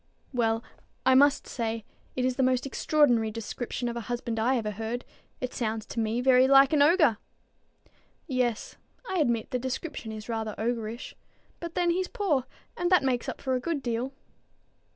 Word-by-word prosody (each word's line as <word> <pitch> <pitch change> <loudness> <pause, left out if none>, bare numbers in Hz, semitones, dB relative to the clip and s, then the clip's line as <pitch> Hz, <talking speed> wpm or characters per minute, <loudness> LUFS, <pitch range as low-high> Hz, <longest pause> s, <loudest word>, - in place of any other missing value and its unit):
"Well, 225 -2 +1 0.4
I 260 - +6
must 280 +2 +5
say, 225 -2 -3 0.3
it 255 - 0
is 255 -1 +1
the 270 - 0
most 255 0 +2
extraordinary 265 -5 +2
description 230 +3 -4
of 235 - -3
a - - -2
husband 235 -2 -2
I 250 +4 +2
ever 215 -2 -2
heard. 225 +4 -4 0.3
It 255 - -4
sounds 220 -2 -2
to 230 - -5
me 225 +2 0
very 255 0 +5
like 275 +1 +6
an 295 - +4
ogre." 300 - +5 1.1
"Yes; 250 -6 -1 0.3
I 375 - -1
admit 235 -7 +1
the 250 - 0
description 260 -1 -4
is 215 0 -8
rather 220 -2 -3
ogrish. 230 +1 -3 0.5
But 340 -1 -7
then 350 -1 +2
he's 365 +1 0
poor, 300 -11 0 0.3
and 350 0 0
that 365 -5 +5
makes 255 -3 0
up - - -6
for 260 - -1
a 255 - +1
good 290 +1 -2
deal." 240 +2 -2
250 Hz, 175 wpm, -28 LUFS, 230-275 Hz, 1.1 s, I